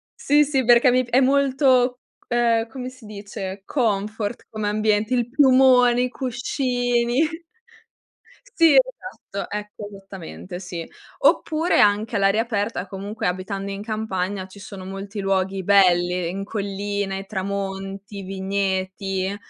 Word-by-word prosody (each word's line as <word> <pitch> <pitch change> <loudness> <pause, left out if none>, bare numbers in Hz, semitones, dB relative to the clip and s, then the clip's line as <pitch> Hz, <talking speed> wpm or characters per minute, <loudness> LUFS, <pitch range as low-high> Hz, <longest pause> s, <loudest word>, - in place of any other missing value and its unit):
Sì, 295 +1 +3
sì 270 -4 0
perché 240 +1 +6
mi 255 +1 +3
pi 235 - -14
è 255 - +5
molto, 260 -2 +3 0.3
ehm, 235 -1 +2
come 255 +1 -6
si 255 -3 -16
dice, 200 -2 -7
confort 215 -2 -1
come 215 -1 -2
ambiente, 215 +2 +1
il 240 -1 0
piumone, 255 -2 +5
i 250 - -1
cuscini 245 +1 0 1.3
Sì, 330 -3 +6
esatto, - - -1
ecco, 210 0 -6
esattamente, 195 -2 -9
sì. 175 -3 -6 0.3
Oppure 320 +2 +2
anche 210 +2 +3
all'aria 200 +2 +3
aperta, 205 -4 -2
comunque 200 +2 -4
abitando 195 +2 -3
in 195 +1 -5
campagna 200 -3 -3
ci 200 +2 -14
sono 195 -1 -9
molti 195 +2 -6
luoghi 195 0 0
belli 180 -3 +3
in 195 +2 -4
colline, 200 -1 -3
tramonti, 195 0 -5
vigneti. 190 0 -2
205 Hz, 125 wpm, -23 LUFS, 195-245 Hz, 1.3 s, perché